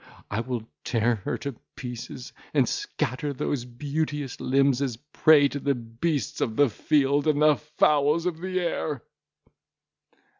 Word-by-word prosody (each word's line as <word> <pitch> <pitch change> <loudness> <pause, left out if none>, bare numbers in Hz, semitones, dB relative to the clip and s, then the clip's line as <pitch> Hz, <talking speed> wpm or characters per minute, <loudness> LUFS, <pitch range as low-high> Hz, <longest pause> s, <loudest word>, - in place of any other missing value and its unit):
I 100 - 0
will 120 -1 -3 0.2
tear 115 0 +1
her - - -1
to 140 -3 -5 0.2
pieces, 125 0 -7 0.2
and - - +4
scatter 135 +4 -2
those 130 -1 -2
beauteous 145 +2 -3
limbs 135 0 +3
as 130 -4 -1
a - - -23 0.2
prey 150 -3 +6
to 145 - -4
the 140 0 +1
beasts 120 +3 -2
of 110 - 0
the 145 -2 +4
field, 145 +3 +2
and 150 -1 +3
the 150 0 +6
fowls 150 +1 +2
of 170 -2 -2
the 185 0 -1
air!" 155 -5 -2
140 Hz, 150 wpm, -26 LUFS, 125-150 Hz, 0.2 s, prey